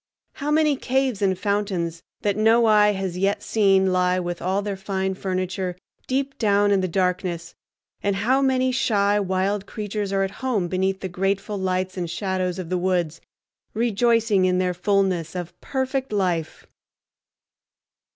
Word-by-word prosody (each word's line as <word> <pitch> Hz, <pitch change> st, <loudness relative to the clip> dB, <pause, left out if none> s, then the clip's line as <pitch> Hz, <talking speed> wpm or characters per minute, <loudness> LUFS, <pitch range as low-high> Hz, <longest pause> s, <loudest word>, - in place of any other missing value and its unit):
How 290 Hz, 0 st, -4 dB
many 305 Hz, -1 st, +3 dB
caves 260 Hz, -5 st, 0 dB
and 190 Hz, -2 st, +2 dB
fountains 190 Hz, -5 st, -1 dB, 0.2 s
that 205 Hz, -1 st, +1 dB
no 225 Hz, +2 st, +4 dB
eye 210 Hz, -1 st, +5 dB
has 190 Hz, -2 st, -3 dB
yet 195 Hz, +1 st, 0 dB
seen 195 Hz, -3 st, +3 dB
lie 180 Hz, 0 st, +2 dB
with 175 Hz, -1 st, -4 dB
all 190 Hz, +3 st, 0 dB
their 205 Hz, -1 st, -3 dB
fine 190 Hz, 0 st, -2 dB
furniture 185 Hz, -1 st, -3 dB, 0.3 s
deep 270 Hz, +1 st, -2 dB
down 205 Hz, -2 st, +3 dB
in 195 Hz, -1 st, +3 dB
the 185 Hz, -, 0 dB
darkness, 180 Hz, -1 st, -1 dB, 0.5 s
and 200 Hz, -1 st, 0 dB
how 245 Hz, +8 st, +2 dB
many 260 Hz, -1 st, +2 dB
shy 205 Hz, -5 st, +2 dB
wild 195 Hz, +1 st, -1 dB
creatures 205 Hz, -1 st, -4 dB
are 195 Hz, 0 st, +1 dB
at 195 Hz, -, -2 dB
home 230 Hz, -9 st, 0 dB
beneath 190 Hz, +2 st, -1 dB
the 190 Hz, -, -3 dB
grateful 195 Hz, +3 st, -1 dB
lights 185 Hz, 0 st, -1 dB
and 175 Hz, -2 st, -3 dB
shadows 185 Hz, 0 st, -2 dB
of 180 Hz, -3 st, -6 dB
the 180 Hz, -1 st, 0 dB
woods, 175 Hz, -3 st, -1 dB, 0.5 s
rejoicing 225 Hz, -3 st, +2 dB
in 180 Hz, 0 st, +2 dB
their 180 Hz, -1 st, +1 dB
fullness 185 Hz, -3 st, 0 dB
of 175 Hz, -2 st, -5 dB
perfect 265 Hz, -1 st, -2 dB
life! 180 Hz, -6 st, -1 dB
195 Hz, 155 wpm, -23 LUFS, 185-210 Hz, 0.5 s, eye